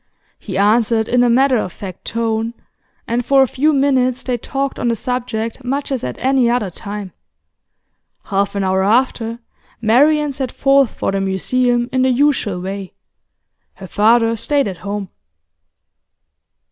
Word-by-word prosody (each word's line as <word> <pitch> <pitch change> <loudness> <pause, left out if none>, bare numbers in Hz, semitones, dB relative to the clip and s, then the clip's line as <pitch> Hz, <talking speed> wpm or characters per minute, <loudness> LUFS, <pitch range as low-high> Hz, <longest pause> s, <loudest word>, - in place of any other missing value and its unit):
He 190 -4 -5
answered 220 +2 +2
in 245 0 +3
a 245 - +3
matter 260 +2 +3
of 185 - -3
fact 185 -1 -9
tone, 225 0 -2 0.5
and 240 +1 -1
for 270 +2 +4
a - - +1
few 290 +6 +1
minutes 260 -3 +1
they 250 - -1
talked 270 +3 -3
on 240 - -1
the 230 - +1
subject 240 0 -4
much 275 +3 -3
as 265 - -2
at 125 - -4
any 260 -2 +2
other 235 -6 0
time. 200 +1 -7 1.1
Half 200 0 -1
an 200 - -1
hour 190 0 +1
after, 230 +1 +1 0.4
Marian 285 +6 +3
set 260 -2 -4
forth 275 -2 +3
for - - -3
the 195 0 -1
Museum 240 +6 0
in 260 - +2
the 260 - +3
usual 255 -8 +1
way. 190 +1 -6 0.8
Her 190 - -10
father 225 +4 +3
stayed 280 +3 0
at 190 -3 -5
home. 200 0 -5
235 Hz, 155 wpm, -18 LUFS, 205-260 Hz, 1.1 s, for